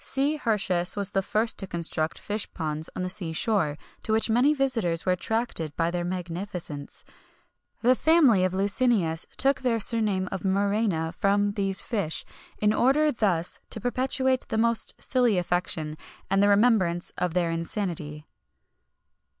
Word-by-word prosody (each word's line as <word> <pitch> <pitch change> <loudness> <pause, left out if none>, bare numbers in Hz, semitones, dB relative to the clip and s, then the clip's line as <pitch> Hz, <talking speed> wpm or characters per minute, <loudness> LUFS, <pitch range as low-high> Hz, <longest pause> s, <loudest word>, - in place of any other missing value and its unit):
C. 280 +3 0
Hirtius 195 -8 0
was 200 0 0
the 195 - +1
first 220 +4 +1
to 195 - -2
construct 165 -2 +1
fish 210 +1 -4
ponds 155 -1 -3
on 185 - -3
the - - -2
sea 175 -3 -4
shore, 160 -6 0 0.2
to - - -4
which 220 +1 +2
many 250 +6 +4
visitors 235 - 0
were 185 - +2
attracted 180 -5 -2
by 165 +1 0
their 175 0 -2
magnificence.[XXI 175 -4 -5
61] - - -24 0.6
The 250 +2 +5
family 290 - +4
of 185 0 0
Licinius 200 -5 +1
took 275 +1 +2
their 240 -3 +1
surname 210 -4 +1
of - - -4
Muræna 195 -4 0
from 205 +1 +1
these 195 -1 +1
fish, 200 -9 -3 0.3
in 210 0 +2
order 295 +6 +3
thus 185 - 0
to - - -1
perpetuate 260 +2 0
the - - -2
most 230 0 +1
silly 245 -6 +1
affection, 175 -3 -1 0.4
and 195 0 +3
the 205 - +4
remembrance 200 -5 +2
of 180 -1 -1
their 175 -2 +1
insanity. 165 -3 -4
200 Hz, 155 wpm, -26 LUFS, 175-230 Hz, 0.6 s, The